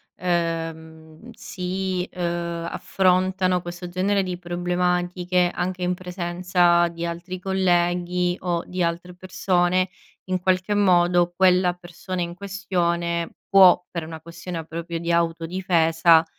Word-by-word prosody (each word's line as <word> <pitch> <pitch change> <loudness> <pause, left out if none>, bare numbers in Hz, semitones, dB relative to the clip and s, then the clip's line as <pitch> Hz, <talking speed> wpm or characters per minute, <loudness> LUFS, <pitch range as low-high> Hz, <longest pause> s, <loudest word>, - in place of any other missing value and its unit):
ehm, 165 0 -4
si, 190 -4 -3
ehm, 170 -1 -3
affrontano 185 -1 +1
questo 175 +1 -7
genere 195 +2 +1
di 180 -1 -4
problematiche, 180 0 0
anche 180 0 -3
in 180 0 +1
presenza 175 -1 +1
di 170 0 -5
altri 175 +2 -5
colleghi 180 -1 +1
o 175 -2 -1
di 180 0 -4
altre 170 +1 -2
persone, 185 0 0 0.4
in 185 0 0
qualche 185 +2 +1
modo 175 -3 +3
quella 180 -1 +4
persona 180 +1 -6
in 170 - -5
questione 175 -3 -2 0.2
può, 185 -2 +6
per 170 -2 -4
una 160 0 -8
questione 170 0 -7
proprio 170 +1 -5
di 170 +1 -2
autodifesa, 165 -1 +3
175 Hz, 115 wpm, -23 LUFS, 170-185 Hz, 0.4 s, può